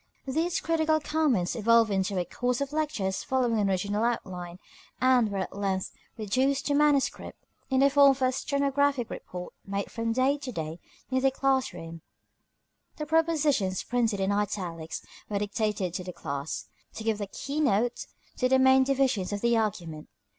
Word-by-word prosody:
These 320 +6 0
critical 315 -1 +2
comments 290 - +1
evolved 230 0 +4
into 195 0 0
a 180 - 0
course 245 +7 -1
of 280 +1 -3
lectures 255 -12 -1
following 245 -4 +1
an 200 -1 +2
original 200 +3 0
outline, 180 -7 -3 0.4
and 255 -3 +4
were 200 - -3
at 190 0 -4
length 195 -2 -2 0.3
reduced 260 +6 0
to 290 - +1
manuscript 290 -2 +1 0.3
in 265 -1 +2
the 275 - +6
form 280 0 +7
of 270 0 +1
a 255 - +3
stenographic 280 -1 0
report 180 0 -7
made 200 0 -4
from 230 0 -2
day 260 +4 +2
to 270 -2 -6
day 160 -4 -5 0.3
in 260 0 +1
the 270 - +4
class 265 -3 +1
room. 165 -2 -9 0.9
The 300 - -4
propositions 300 - +1
printed 230 -4 0
in 195 +1 +1
italics 185 -6 -3 0.2
were 205 - -1
dictated 205 -3 -1
to 180 0 -3
the 180 0 -7
class, 140 0 -4 0.3
to 220 - -6
give 220 -1 0
the 205 - -3
key 280 +9 -5
note 245 -3 +1 0.3
to 255 - +1
the 265 - +5
main 265 0 +6
divisions 260 -8 +1
of 205 0 -3
the 235 0 +3
argument. 175 -8 -2
230 Hz, 170 wpm, -28 LUFS, 195-275 Hz, 0.9 s, form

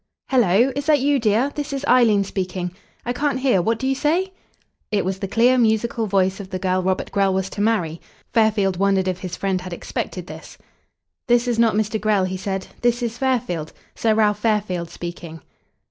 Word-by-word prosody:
"Hello! 240 0 +3
Is 285 +1 -3
that 300 -2 +5
you, 280 +1 +2
dear? 230 +5 +2
This 295 -1 -4
is 275 0 -3
Eileen 225 -5 +4
speaking.... 185 -2 -3 0.3
I 245 - -1
can't 280 0 -1
hear. 255 -9 +3
What 225 +5 0
do 265 - -4
you 270 - +2
say?" 335 +8 0 0.6
It 205 -3 +1
was 190 0 -2
the 195 - -3
clear, 245 +5 +3
musical 225 0 +1
voice 190 -1 +1
of 195 -2 -8
the 185 - -3
girl 185 0 0
Robert 185 0 -1
Grell 195 -1 +2
was 190 0 -2
to 205 - -4
marry. 190 -7 0 0.3
Fairfield 210 -5 +2
wondered 195 -1 +2
if 185 -1 -2
his 180 -2 -5
friend 190 -2 -1
had 180 -1 -7
expected - - -5
this. - - -11 0.7
"This 240 0 +3
is 235 -2 0
not 230 -2 +4
Mr. 215 0 -1
Grell," 210 -3 +2
he 185 0 -3
said. 190 0 -3 0.2
"This 240 0 +1
is 235 0 -3
Fairfield 220 - -1 0.2
Sir 220 -1 +1
Ralph 210 -1 +2
Fairfield 205 -6 -1
speaking." 170 -2 -8
210 Hz, 195 wpm, -21 LUFS, 190-240 Hz, 0.7 s, that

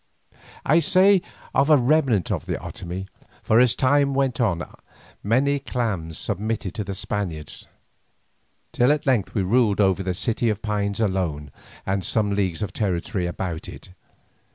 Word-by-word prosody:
I 155 +4 +5
say 190 +4 +5 0.3
of 135 +3 +3
a 155 - +7
remnant 130 - +2
of - - -3
the - - -1
Otomie, 90 +2 -6 0.4
for 110 - +4
as 125 -2 +4
time 140 +1 +2
went 135 -3 0
on 85 -7 +1 0.6
many 135 +7 +2
clans 105 - -3
submitted 105 -1 -3
to 105 - -3
the 100 -1 -5
Spaniards, 90 -7 -4 1.0
till 125 +3 +3
at 150 +1 0
length 125 -8 +1
we 100 - +1
ruled 105 +1 +2
over 95 -2 +3
the 95 -1 -2
City 115 +3 0
of 105 -1 -3
Pines 100 -1 -1
alone 90 -9 -1 0.3
and 95 0 -1
some 105 +1 0
leagues 95 -3 -1
of 95 -2 -5
territory 95 -1 -1
about 85 -2 -4
it. - - -11
105 Hz, 155 wpm, -23 LUFS, 95-125 Hz, 1.0 s, a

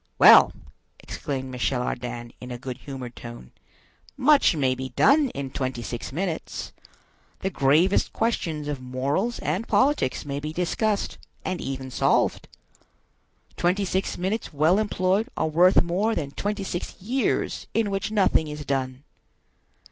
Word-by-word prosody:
"Well!" - - +9 0.5
exclaimed 130 -2 -5
Michel 125 0 -1
Ardan, 120 -1 -5
in 125 - -8
a 125 - -5
good 125 0 -7
humored 130 -4 -8
tone, 120 - -10 0.7
"much 275 - +5
may 135 -4 +2
be 130 +1 -5
done 280 - +4
in 135 -1 -4
twenty 130 -3 -3
six 120 +1 -5
minutes. 170 +2 -4 0.7
The 190 - -1
gravest 155 +8 +3
questions 165 -10 -1
of 145 -3 -3
morals 140 - -1
and 180 +10 -2
politics 275 - +2
may 140 0 -3
be 150 +2 -5
discussed, 200 +5 -1 0.3
and 185 -2 -2
even 130 -1 -5
solved. - - +1 1.1
Twenty 185 +3 +1
six 190 +1 -1
minutes 195 +5 -2
well 160 +6 +3
employed 200 0 +1
are - - +1
worth 175 +4 +5
more 195 +6 0
than 140 -2 -3
twenty 205 +5 -3
six 175 -2 -5
years 245 +7 -1
in 225 -3 +1
which 195 +1 -2
nothing 195 -6 +2
is 150 -1 -6
done. 130 -1 -2
155 Hz, 140 wpm, -25 LUFS, 130-195 Hz, 1.1 s, Well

